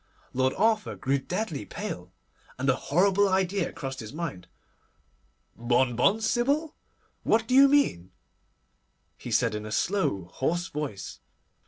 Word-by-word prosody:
Lord 130 +1 +1
Arthur 215 +1 +1
grew 135 +1 0
deadly 175 - -3
pale, - - -6 0.5
and 130 +2 -2
a - - 0
horrible 195 +7 +2
idea 190 0 0
crossed 135 -1 -6
his 110 -2 -7
mind. 155 - -5 1.1
'Bonbon, 125 - +2
Sybil? 280 +8 0 0.5
What 225 +1 +2
do 255 - -1
you 275 +1 +8
mean?' 275 - +2 1.1
he - - -9
said - - +2
in 105 0 -4
a 110 - -7
slow, 175 - 0
hoarse 175 +6 -1
voice. 145 -10 -5
170 Hz, 130 wpm, -27 LUFS, 130-215 Hz, 1.1 s, you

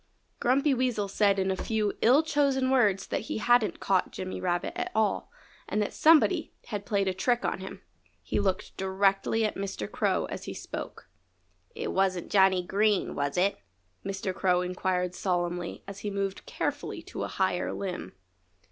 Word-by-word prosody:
Grumpy 275 +4 +3
Weasel 245 -5 0
said 200 0 +2
in 190 0 +1
a - - 0
few 215 +1 -1
ill 265 +7 +6
chosen 280 -4 +1
words 210 -7 +3
that - - -2
he - - -1
hadn't 240 0 +3
caught 190 -2 +1
Jimmy 185 0 -5
Rabbit 175 - -1
at 360 0 -3
all, 220 -1 +1 0.4
and 210 - 0
that 210 - -1
somebody 320 0 +4
had 205 -2 -4
played 200 -2 +1
a 190 - +1
trick 240 +7 +1
on - - -1
him. 190 - -8 0.4
He - - -1
looked 190 -2 -1
directly 195 +3 +1
at 215 - -1
Mr. 195 0 -4
Crow - - 0
as - - -6
he - - -6
spoke. - - -7 0.7
"It 455 0 -3
wasn't 190 -2 0
Johnny 190 -2 +4
Green, 205 +1 +1
was 140 +3 -2
it?" 195 +3 +2 0.4
Mr. 195 -1 -3
Crow 180 -1 +2
inquired 180 0 -1
solemnly 175 -2 -2
as 195 0 -7
he 210 - -3
moved 195 - -3
carefully - - -3
to - - -7
a - - -1
higher 185 -2 0
limb. 185 -2 -5
195 Hz, 170 wpm, -28 LUFS, 185-225 Hz, 0.7 s, ill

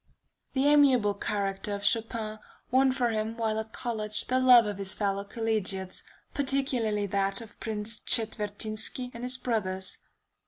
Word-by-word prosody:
The 270 0 +1
amiable 270 -8 +5
character 200 0 -2
of 200 0 -5
Chopin 220 0 0 0.3
won 260 +1 +4
for 250 -2 +1
him 220 +1 -2
while 220 -1 0
at 220 0 -6
college 215 -3 -2
the 255 0 +1
love 250 -3 +7
of 205 -1 -4
his 195 +1 -3
fellow 200 -1 -1
collegiates, 200 -4 -2 0.3
particularly 260 -7 0
that 195 0 0
of 225 -2 -12
Prince 220 0 -2
Czetwertynski 220 +2 -1
and 235 - -8
his 250 +1 -1
brothers. 190 -7 -1
220 Hz, 145 wpm, -28 LUFS, 205-245 Hz, 0.3 s, love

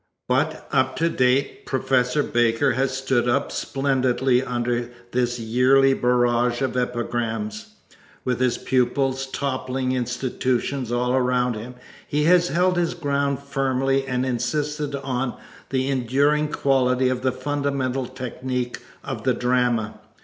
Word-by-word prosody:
But - - 0
up 130 0 +2
to 165 +1 +1
date 130 -1 +1
Professor 130 +2 +1
Baker 120 +3 +2
has 135 0 0
stood 130 -2 +1
up 140 +4 +1
splendidly 130 -2 +1
under 120 -1 -2 0.2
this 120 -1 0
yearly 130 +4 +4
barrage 120 0 +2
of 130 - -1
epigrams. 125 - -3 0.5
With 125 -2 0
his 125 -1 +1
pupils 130 +1 0
toppling 130 -1 -2
institutions 125 0 -1
all 125 +1 +1
around 125 -1 +2
him 115 +3 -7 0.3
he 150 +1 0
has 175 +2 +5
held 180 +3 +2
his 170 -1 0
ground 140 -1 -1
firmly 135 -1 0
and 125 0 0
insisted 145 +4 -2
on 135 -2 -3 0.3
the 130 -1 0
enduring 140 +4 +2
quality 130 -2 +2
of 130 -1 -1
the 130 0 +1
fundamental 135 -1 -2
technic 125 0 -4 0.2
of - - -5
the - - +2
drama. 125 -3 0
130 Hz, 130 wpm, -23 LUFS, 125-135 Hz, 0.5 s, has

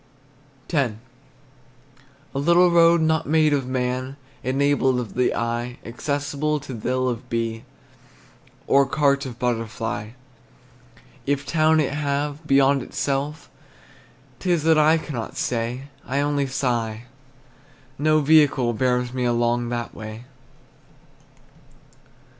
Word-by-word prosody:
X. 140 -9 0 1.4
A 135 - -2
little 170 +4 +4
road 170 0 +5
not 160 0 +1
made 155 -1 +4
of 135 -3 0
man, 130 +1 -2 0.3
Enabled 135 0 +2
of 120 -3 -5
the 125 0 +1
eye, 120 +1 -2
Accessible 145 +4 -2
to 135 -1 -8
thill 130 +3 -1
of 125 0 -4
bee, 115 -1 -2 1.0
Or 140 0 +4
cart 140 -1 +1
of 120 -2 -8
butterfly. 115 -2 -3 1.1
If 140 0 0
town 155 0 +3
it 140 -2 0
have, 145 +1 -2
beyond 135 0 +4
itself, 145 +4 -3 0.9
'T 185 - -3
is 170 -4 +1
that 160 -1 +4
I 155 +2 +5
cannot 135 -8 -6
say; 120 +2 -2 0.2
I 135 +3 -2
only 145 -1 0
sigh, 120 -4 -2 1.0
no 155 +1 +3
vehicle 140 -5 +4
Bears 125 +1 0
me 125 -1 -1
along 120 0 +1
that 120 -1 -4
way. 110 +2 -9
135 Hz, 115 wpm, -23 LUFS, 120-150 Hz, 1.4 s, road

